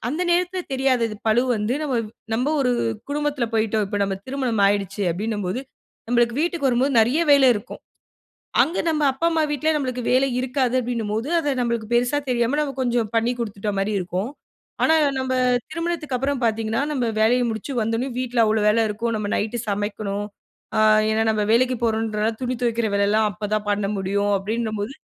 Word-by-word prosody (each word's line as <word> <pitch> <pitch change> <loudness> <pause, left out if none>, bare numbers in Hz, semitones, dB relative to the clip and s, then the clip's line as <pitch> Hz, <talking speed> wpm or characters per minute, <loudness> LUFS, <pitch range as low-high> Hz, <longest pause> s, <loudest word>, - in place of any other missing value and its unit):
அந்த 310 +7 -1
நேரத்துல 360 +1 0
தெரியாது 260 -2 +2
அது 215 - -7
பழு 235 +3 +4
வந்து 210 +4 -1
நம்ம, 265 -4 -1 0.4
நம்ம 260 +7 0
ஒரு 250 - +2 0.4
குடும்பத்துல 295 -3 -1
போயிட்டோம் 220 -1 +1
இப்ப 205 - -2
நம்ம 195 -1 -2
திருமணம் 255 -6 -1
ஆகிடுச்சு, 200 0 0
அப்பிடின்னம்போது, 205 +2 -3 0.5
நம்மளுக்கு 240 +1 +2
வீட்டுக்கு 335 -5 0
வரும்போது 255 +3 +1
நிறைய 255 +8 +1
வேலை 275 -2 +6
இருக்கும். 205 - -9 0.8
அங்கே 335 - -1
நம் 315 -2 0
அப்பா, 300 +6 -1
அம்மா 320 -1 +1
வீட்ல 295 +2 -1
நமக்கு 255 -4 -2
வேலை 260 +2 +4
இருக்காது 255 -1 0
அப்பஜடின்னும்போது 230 0 -2
அத 290 -4 0
நம்மளுக்கு 235 -2 -1
பெரிசா 245 +4 +2
தெரியாம 240 +4 +1
நாம 280 -3 -2
கொஞ்சம் 240 -3 0
பண்ணி 230 +2 +2
கொடுத்துட்ட 210 -2 -3
மாரி 195 +2 0
இருக்கும். 185 +4 -3 0.6
ஆனா 320 - +4 0.3
நம்ப 260 0 -2 0.4
திருமணத்துக்கு 330 -5 -2
அப்புறம் 270 -1 -1
பார்த்தீங்கன்னா, 225 +1 0
நம்ம 245 -5 0
வேலை 225 +3 +4
முடிச்சு 220 +5 -5
வந்த 225 +1 0
உடனே 260 +3 -2
வீட்ல 245 -2 +1
அவ்வளவு 215 -1 +1
வேலை 225 +1 +3
இருக்கும். 230 +3 -2
நம்ம 210 -1 -3
நைட் 220 +3 -2
சமைக்கணும். 205 0 -2 0.5
ஆ 215 - +3 0.3
ஏன்னா 220 0 +2
நம்ம 215 -1 0
வேலைக்கு 255 +2 +3
போறோம்ன்றனால 220 -1 0
துணி 250 0 -1
துவைக்கிற 235 -1 +1
வேலல்லாம் 205 +2 +2
அப்பதான் 210 +2 -3
பண்ண 205 -1 0
முடியும் 200 +2 0
அப்பிடினம்போது. 215 +3 -3
235 Hz, 165 wpm, -22 LUFS, 215-260 Hz, 0.8 s, வேலை